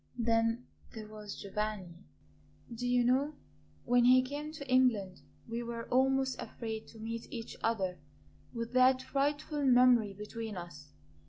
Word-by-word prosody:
Then 230 0 +1 0.3
there 215 -1 -7
was 210 -1 -8
Giovanni. 200 -3 -3 0.8
Do 245 +2 -3
you 245 0 +3
know, 270 +5 +2 0.5
when 245 0 +4
he 255 +1 +7
came 290 +3 -5
to 280 -3 -8
England 235 -8 +2 0.3
we 230 +1 -3
were 235 -1 -5
almost 265 0 +2
afraid 220 -2 -6
to 225 - -14
meet 230 +1 -6
each 230 -1 -6
other 190 -6 -1 0.5
with 230 0 -5
that 255 0 +5
frightful 285 +2 -1
memory 245 -5 +5
between 210 0 -6
us. 150 -5 -9
235 Hz, 140 wpm, -32 LUFS, 215-255 Hz, 0.8 s, he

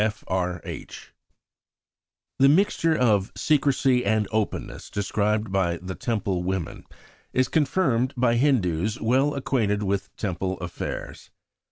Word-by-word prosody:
F. 110 0 -2
R. 90 -2 -1
H. - - -9 1.3
THE 135 +1 +6
mixture 165 -1 +3
of 105 -6 +2
secrecy 135 -4 +2
and 110 0 +1
openness 110 -1 -3
described 105 +1 -1
by 90 -3 +1
the 90 +2 -6
Temple 100 -4 -2
woman 90 -1 -3 0.5
is 130 0 +2
confirmed 130 -5 +1
by 120 -1 +3
Hindus 110 - +1
well 130 +6 +2
acquainted 110 -7 0
with 100 0 -1
Temple 95 -1 -2
affairs. 85 -1 -6
110 Hz, 120 wpm, -25 LUFS, 95-130 Hz, 1.3 s, THE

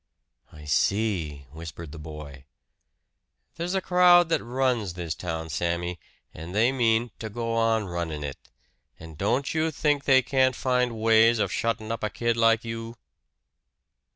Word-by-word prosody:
"I 75 -1 -13
see," 80 -4 0
whispered 80 0 -9
the 80 - -9
boy. 75 -3 -10 1.1
"There's 175 +3 -3
a 190 - +1
crowd 180 -2 +5
that 165 - +1
runs 120 -6 -1
this 85 -3 -3
town, 80 -2 -5
Sammy; 85 +1 -2 0.3
and 85 +4 -8
they 115 +4 +4
mean 120 -2 +1
to 110 - -5
go 115 +1 -3
on 115 -1 +1
runnin' 85 -4 -4
it. 70 -2 -8 0.5
And 80 -1 -11
don't 120 - 0
you 160 0 +1
think 145 -2 0
they 130 -1 +5
can't 130 -2 +2
find 125 -2 0
ways 115 +1 +5
of 105 - 0
shuttin' 115 -1 -2
up 115 - -4
a 105 - 0
kid 115 +1 -1
like 115 0 +3
you!" 115 0 -6
115 Hz, 155 wpm, -26 LUFS, 85-125 Hz, 1.1 s, crowd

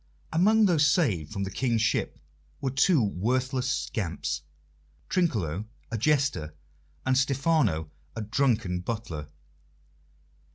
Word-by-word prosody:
Among 210 +6 +5
those 160 -6 +4
saved 110 - +1
from 100 -2 -3
the 95 - -4
King's 115 0 +1
ship 110 - 0 0.4
were 135 -2 -1
two 140 +1 +4
worthless 125 +6 0
scamps 80 - -2 0.7
Trinculo, 105 - 0 0.3
a 115 - -1
jester, 135 - +1 0.5
and 130 - +3
Stephano, 135 - +1 0.2
a 110 - -3
drunken 110 -5 +1
butler. 90 -8 -5
120 Hz, 110 wpm, -27 LUFS, 95-140 Hz, 0.7 s, Among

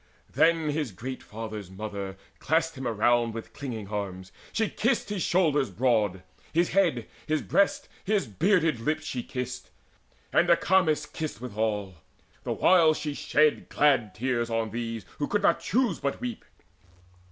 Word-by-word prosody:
Then 165 -2 +3
his 145 -5 -2
great 125 +8 -6
father's 110 -3 -7
mother 100 -1 -6 0.2
clasped 165 0 +1
him 130 -2 -4
round 115 +1 +2
With 115 - -7
clinging 115 -8 -6
arms: 95 -3 -5 0.2
she 220 -1 +1
kissed 235 -1 0
his 205 -3 -2
shoulders 150 - +2
broad, 105 -3 +1 0.3
His 170 +2 +3
head, 165 - +2 0.2
his 155 -1 0
breast, 200 - +2 0.2
his 205 -4 +1
bearded 160 - +2
lips 155 +6 -1
she 125 - -3
kissed, 125 0 -5 0.6
And 175 - +4
Acamas 170 -3 +3
kissed 155 -8 -5
withal, 105 -5 -2 0.4
the - - -4
while 165 -4 +5
she 150 -1 -3
shed 150 +1 +2
Glad 130 -9 +2
tears 120 0 -1
on 115 -1 -1
these 115 -1 -4
who 145 - 0
could 205 - 0
not - - +4
choose 235 -7 +1
but 140 - -2
weep. 245 -2 -5
130 Hz, 150 wpm, -27 LUFS, 110-165 Hz, 0.6 s, while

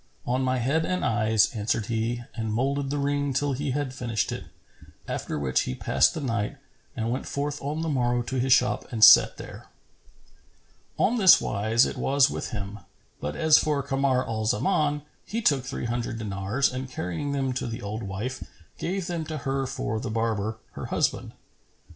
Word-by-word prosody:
"On 125 +2 0
my 130 0 +1
head 140 +7 +1
and 185 +2 -1
eyes," 110 -2 +3
answered 110 -1 -1
he 115 +1 -2
and 110 -2 -3
moulded 135 +4 0
the 145 - -1
ring 145 0 0
till 145 +1 +1
he 140 +2 -3
had 135 0 -2
finished 115 -5 -2
it, - - -5 0.6
after - - -3
which 65 -3 +1
he 65 - -3
passed - - +2
the 160 - -3
night 115 0 -2 0.4
and 115 0 -1
went 130 - -3
forth 145 +1 -3
on 150 +3 -3
the - - -2
morrow 120 -4 +1
to 130 +2 -3
his 130 +1 0
shop 125 0 +3
and 110 -3 +1
sat - - +8
there. - - -10 1.3
On 235 +2 +2
this 190 -4 +8
wise 110 +4 +2
it - - -4
was 140 0 +3
with - - -4
him; 105 -1 -5 0.4
but 75 +1 -4
as 160 -1 +5
for 150 -2 0
Kamar 135 -1 +1
al 110 -1 -2
Zaman, 150 - +1 0.2
he 225 - -3
took 140 - +2
three 135 -2 -4
hundred 115 -1 -2
dinars 105 +5 -1
and 130 0 -5
carrying 90 - -3
them 135 -2 -1
to 125 - -3
the 115 0 -6
old 105 +3 -4
wife, 105 +6 -4 0.4
gave 185 +1 -2
them 170 -2 -3
to 155 0 -5
her 135 -1 -2
for 110 -3 -3
the 125 0 -4
barber, 110 -1 -1
her - - -7
husband. - - -1
130 Hz, 185 wpm, -26 LUFS, 110-140 Hz, 1.3 s, sat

